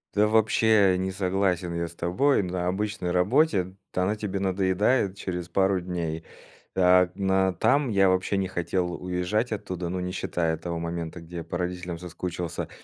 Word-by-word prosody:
Да, 105 +1 +4
вообще, 110 -3 +4
не 95 +1 -2
согласен 90 -2 0
я 85 0 -1
с 85 - -11
тобой, 95 +12 +2
на 90 -1 -2
обычной 100 -1 -2
работе. 95 - +2 0.2
Та 90 - 0
она 105 +3 +1
тебе 100 -2 -3
надоедает 95 +2 +1
через 90 -3 -5
пару 95 +1 +2
дней. 85 -3 -3 0.5
А 90 -1 +5
на 95 -1 +1
там, 140 - +2
я 95 -2 +4
вообще 95 +2 +1
не 95 -1 0
хотел 90 0 -1
уезжать 90 +7 -1
оттуда, 90 -4 -4
ну 90 0 -2
не 90 0 -3
считая 85 -3 -1
того 85 0 -4
момента, 85 0 -4
где 85 +1 -9
я 85 - -4
по 85 - -5
родителям 90 -1 -4
соскучился. 90 -1 -5
90 Hz, 170 wpm, -26 LUFS, 90-100 Hz, 0.5 s, А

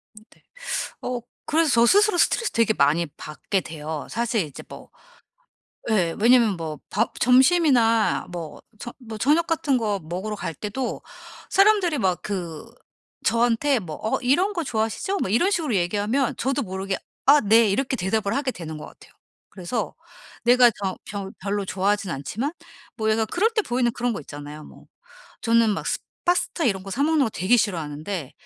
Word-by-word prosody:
네. 215 +1 -19 0.6
어 250 -1 -3 0.3
그래서 320 0 +2
저 235 0 +5
스스로 410 - +4
스트레스 465 +5 +2
되게 230 -1 +2
많이 155 +4 +2
받게 155 +6 -3
돼요. 155 -2 -6
사실 230 -3 0
이제 145 - -10
뭐 - - -12 1.0
예 180 -6 +2
왜냐하면 230 -4 +5
뭐 155 -2 -5
밥 220 +4 -1
점심이나 255 -4 +4
뭐 170 -3 -7 0.2
저 240 - -7
뭐 225 -3 -8
저녁 300 +9 +2
같은 305 -5 +1
거 210 -4 -1
먹으러 185 +6 -4
갈 165 - -5
때도 220 - -4 0.5
사람들이 390 -5 +4
막 185 -3 0
그 180 -3 -5 0.6
저한테 240 +4 +2
뭐 160 -7 -7
"어 220 - 0
이런 345 +11 +2
거 345 -4 -2
좋아하시죠?" 225 - -1
뭐 - - -1
이런 295 - +2
식으로 315 - 0
얘기하면 205 +8 0
저도 270 +2 0
모르게 190 -1 -3 0.3
"아 290 +2 +7
네." 220 +1 +5
이렇게 260 +6 0
대답을 200 0 -1
하게 275 -2 -1
되는 160 -5 -7
것 - - -8
같아요. - - -18 0.4
그래서 195 +4 -4 0.5
내가 245 0 +6
저 190 -1 -2
벼 200 -1 -5
별로 200 +1 -2
좋아하진 195 -1 0
않지만 220 - -3 0.4
뭐 220 0 -1
약간 220 0 +1
그럴 425 +6 +2
때 430 - +3
보이는 245 -6 0
그런 245 0 -1
거 - - -5
있잖아요 145 +2 -9
뭐. - - -16 0.6
저는 230 -1 +3
막 200 - -3
스 - - 0 0.3
파스타 355 -2 +1
이런 195 -5 +1
거 195 - -8
사 275 +8 -1
먹는 310 -2 +3
거 225 - -2
되게 195 +7 +2
싫어하는데 165 - -3
220 Hz, 325 characters per minute, -24 LUFS, 190-260 Hz, 1.0 s, 아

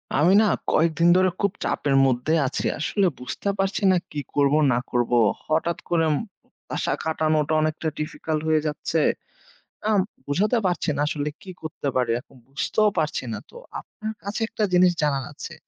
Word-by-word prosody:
আমি 165 +7 +4
না - - +4 0.3
কয়েকদিন 165 +1 +3
ধরে 185 0 +4
খুব 200 -1 +2
চাপের 140 -2 0
মধ্যে 130 +4 +1
আছি। 130 - -3
আসলে 195 +5 +1
বুঝতে 125 +10 -4
পারছি 195 +3 0
না 185 - +4
কি 150 - -4 0.2
করব, 140 -1 +3 0.2
না 120 - +2
করব। 120 -1 0 0.4
হঠাৎ 165 +2 0
করে 165 -2 +2 0.7
আশা - - -1
খাটানোটা 155 -1 +1
অনেকটা 155 +1 -1
difficult 155 0 -3
হয়ে 155 -1 +3
যাচ্ছে। 155 +2 -1 0.9
আম 210 - +4 0.3
বুঝাতে 205 - +2
পারছি 175 -3 0
না - - 0
আসলে 150 -1 -2
কি 190 - -9
করতে 155 -2 -5
পারি 125 -2 +1
এখন 135 - -23
বুঝতেও 210 +10 +1
পারছি 155 -3 0
না। 105 - -4
তো - - -19 0.2
আপনার 220 0 -7
কাছে 200 +3 -4
একটা 220 - -3
জিনিস 180 0 +6
জানার 140 -3 +1
আছে। 160 - -8
155 Hz, 165 wpm, -24 LUFS, 145-185 Hz, 0.9 s, জিনিস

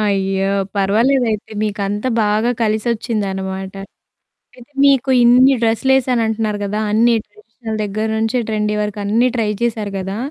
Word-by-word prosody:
అయ్యో! 195 -2 0 0.3
పర్వాలేదు 230 +7 +2
అయితే. 210 -1 -4
మీకంతా 205 +2 -2
బాగా 215 +3 +1
కలిసొచ్చిందనమాట. 205 -4 -2 0.8
అయితే, 250 +3 -17
మీకు 270 -1 +3
ఇన్ని 250 +3 +6
డ్రెస్‌లేశాను 250 +2 +2
అంటన్నారు 215 -2 -2
కదా! 210 +2 -2
అన్ని 230 +2 +3
ట్రెడిషనల్ 235 - -8
దగ్గర 215 +2 -2
నుంచే 225 +3 0
ట్రెండీ 210 -1 -1
వరకు 210 0 -4
అన్నీ 230 +5 +2
ట్రై 220 -2 0
చేశారు 215 -4 -2
గదా! 190 +2 -4
215 Hz, 130 wpm, -18 LUFS, 205-235 Hz, 0.8 s, ఇన్ని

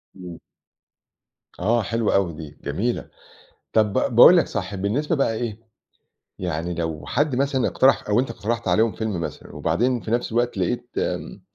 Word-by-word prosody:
امم. 90 -3 -9 1.2
آه، 115 +6 +2
حلوة 115 0 0
أوي 95 -4 +1
دي، 75 -2 -10
جميلة. 120 +4 -2 0.6
طَب 105 -2 +3
ب 125 - 0
باقول 175 +9 +9
لك 170 - +3
صح، 95 +1 -4
بالنسبة 120 - -1
بقى 135 -6 +1
إيه، 110 -1 -4 0.8
يعني 85 -1 -3
لو 80 -2 -4
حد 145 -3 0
مثلًا 135 -1 +1
اقترح 135 -4 +3
أو 105 +3 +3
أنت 130 - -3
اقترحت 115 -1 -3
عليهم 110 +5 +3
فيلم 105 -2 -3
مثلًا - - -7
وبعدين 125 +1 0
في 110 - -7
نَفْس 120 0 -1
الوقت 120 -2 0
لقيت 120 +6 -1
م - - -3
110 Hz, 160 wpm, -23 LUFS, 90-120 Hz, 1.2 s, باقول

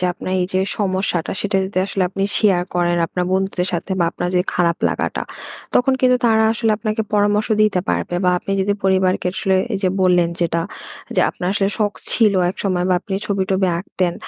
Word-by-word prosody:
যে 180 - -1
আপনার 185 - -6
এই 180 - 0
যে 190 - +3 0.2
সমস্যাটা, 190 -3 -1
সেটা 200 -1 0
যদি 190 -1 -3
আসলে 195 -1 -1
আপনি 195 +1 -4 0.2
শেয়ার 190 -5 +3
করেন 175 0 +1
আপনার 180 +1 -2
বন্ধুদের 190 -1 0
সাথে 175 +3 -3
বা 170 - +3
আপনার 175 - -3
যে - - +4
খারাপ 170 -1 +2
লাগাটা, - - -2 0.5
তখন 265 +2 +3
কিন্তু 250 -1 +4
তারা 220 -1 +4
আসলে 225 -1 0
আপনাকে 215 0 -1
পরামর্শ 205 +1 +2
দিতে 200 -4 +2
পারবে। 175 - -1
বা 180 - +4
আপনি 195 - -4
যদি 200 +1 +1
পরিবারকে 185 -1 +2
আসলে 190 -1 +1 0.2
এই 195 - 0
যে 185 - +3
বললেন 180 -2 +3
যেটা, 170 -1 0 0.5
যে - - +3
আপনার 180 - -6
আসলে 195 -1 +1
শখ 205 -1 +1 0.2
ছিল 215 -4 +4 0.2
একসময় 185 -2 -1
বা 185 - +3
আপনি 195 -1 -5
ছবি-টবি 190 -1 0
আঁকতেন। 180 -1 -2
190 Hz, 195 wpm, -19 LUFS, 180-205 Hz, 0.5 s, যে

